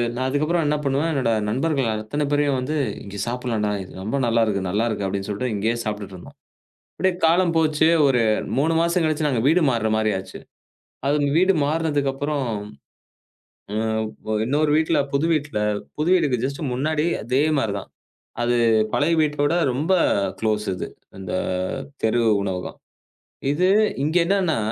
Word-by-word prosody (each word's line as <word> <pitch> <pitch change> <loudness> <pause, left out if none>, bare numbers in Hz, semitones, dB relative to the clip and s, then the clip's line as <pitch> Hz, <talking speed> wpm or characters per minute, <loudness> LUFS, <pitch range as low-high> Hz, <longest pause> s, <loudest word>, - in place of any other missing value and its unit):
நான் 130 +1 -1
அதுக்கப்புறம் 155 +5 +1
என்ன 150 - +2
பண்ணுவேன்? 140 +4 0
என்னோட 130 -5 +1 0.2
நண்பர்கள் 135 +1 0
அத்தனை 110 +8 -3
பேரையும் 145 -2 +2
வந்து 140 +5 -3 0.3
இங்க 100 0 -9
சாப்பிடலாம்டா. 120 -4 -1 0.3
ரொம்ப 110 +7 -2
நல்லா 115 0 +2
இருக்கு. 100 -3 -1
நல்லா 105 +5 +1
இருக்கு 105 -3 -2
அப்படின்னு 100 +1 -3
சொல்லிட்டு 110 +3 -2
இங்கேயே 110 +3 0
சாப்பிட்டுட்டு 105 -3 -5
இருந்தோம். 90 - -13 0.6
அப்படியே 190 0 +1
காலம் 170 +1 +3
போச்சு 155 0 +3 0.2
ஒரு 130 -3 +3 0.4
3 160 +4 +2
மாசம் 170 +1 +2
கழிச்சு 155 -1 0
நாங்க 125 -5 0
வீடு 170 +3 +4
மாறின 110 -3 0
மாதிரி 110 0 +1
ஆச்சு. 95 - -9 0.7
அது 145 0 +1
வீடு 185 +2 +4
மாறினதுக்கு 150 -3 0
அப்புறம் 145 -1 -2 2.0
இன்னொரு 150 +4 +1
வீட்ல 160 0 +2
புது 140 +2 +1
வீட்ல, 145 -8 -2 0.4
புது 155 +3 0
வீடுக்கு 140 -9 +2
ஜ்ஸ்ட்டு 140 +1 -3
முன்னாடி 150 +4 0 0.2
அதே 125 +5 +1 0.2
மாதிரிதான். 100 -7 -2 0.5
அது 120 0 +1 0.4
பழைய 155 +3 +2
வீட்டோட 145 0 +1 0.2
ரொம்ப 150 +9 0 0.5
க்ளோஸ் 105 -1 0
இது. - - -5 0.3
அந்தத் 95 +7 -3
தெரு 110 +2 +2 0.2
உணவகம். 95 -2 -4 0.7
இது 180 +6 +2 0.4
இங்க 155 +4 +1
என்னன்னா, 185 -3 +1
140 Hz, 145 wpm, -22 LUFS, 110-155 Hz, 2.0 s, வீடு